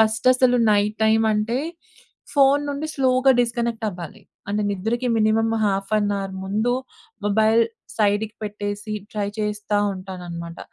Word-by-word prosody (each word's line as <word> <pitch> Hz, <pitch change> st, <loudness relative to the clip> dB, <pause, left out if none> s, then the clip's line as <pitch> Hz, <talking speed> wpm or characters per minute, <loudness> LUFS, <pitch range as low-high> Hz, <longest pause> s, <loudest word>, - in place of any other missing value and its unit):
ఫస్టసలు 245 Hz, +3 st, +4 dB
night 210 Hz, 0 st, +2 dB
టైమంటే, 220 Hz, +2 st, +2 dB, 0.7 s
phone 280 Hz, 0 st, +4 dB
నుండి 285 Hz, +2 st, -3 dB
స్లోగా 260 Hz, 0 st, +3 dB
డిస్‌క‌నెక్టవ్వాలి. 225 Hz, -5 st, -3 dB, 0.3 s
అంటే, 210 Hz, +1 st, 0 dB
నిద్రకి 225 Hz, +6 st, -1 dB
మినిమమ్ 225 Hz, +1 st, +2 dB
హాఫ్ 195 Hz, -1 st, -1 dB
ఎన్ 205 Hz, -1 st, 0 dB
అవర్ 195 Hz, -1 st, -5 dB
ముందు 215 Hz, +5 st, 0 dB, 0.5 s
మొబైల్ 220 Hz, +2 st, +4 dB, 0.3 s
సైడికి 210 Hz, 0 st, +1 dB
పెట్టేసి, 210 Hz, +1 st, -4 dB, 0.2 s
ట్రై 205 Hz, -2 st, -2 dB
చేస్తా 210 Hz, 0 st, -1 dB, 0.2 s
ఉంటాననమాట. 175 Hz, -3 st, -7 dB
215 Hz, 110 wpm, -22 LUFS, 205-235 Hz, 0.7 s, ఫస్టసలు